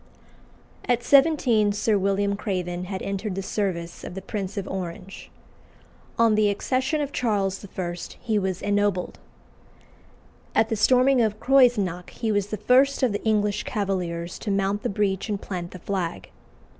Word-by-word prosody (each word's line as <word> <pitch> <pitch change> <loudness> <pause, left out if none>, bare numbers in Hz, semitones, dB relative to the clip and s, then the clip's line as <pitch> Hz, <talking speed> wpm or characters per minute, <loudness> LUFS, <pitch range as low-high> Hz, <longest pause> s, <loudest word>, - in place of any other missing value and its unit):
At 245 -1 +1
seventeen 265 -8 +4
Sir 210 +1 +1
William 200 +1 +1
Craven 180 -3 -3
had 190 0 -5
entered 200 0 -3
the 195 - -3
service 175 -4 -3
of 180 - -7
the 190 - -5
Prince 200 -1 -5
of 195 - -3
Orange. 190 +1 -6 0.9
On 230 -1 +4
the 210 -1 +3
accession 260 +8 0
of 285 -1 -3
Charles 200 -7 -1
I. 180 -3 -4 0.2
he 220 -3 0
was 190 -2 -3
ennobled. 205 -3 0 1.4
At 225 - +3
the 225 - 0
storming 255 +4 +4
of 215 -2 0
Creuzenach 235 -10 +3
he 225 -2 -3
was 205 -1 +1
the 215 - -4
first 265 +6 +3
of 250 - +3
the 205 - -3
English 210 -2 +1
Cavaliers 180 -6 -3
to 215 - -5
mount 200 +1 0
the - - -2
breach 195 0 -1
and 205 -2 -1
plant 180 -3 -5
the 185 - -9
flag. 170 - -4
205 Hz, 155 wpm, -25 LUFS, 190-225 Hz, 1.4 s, seventeen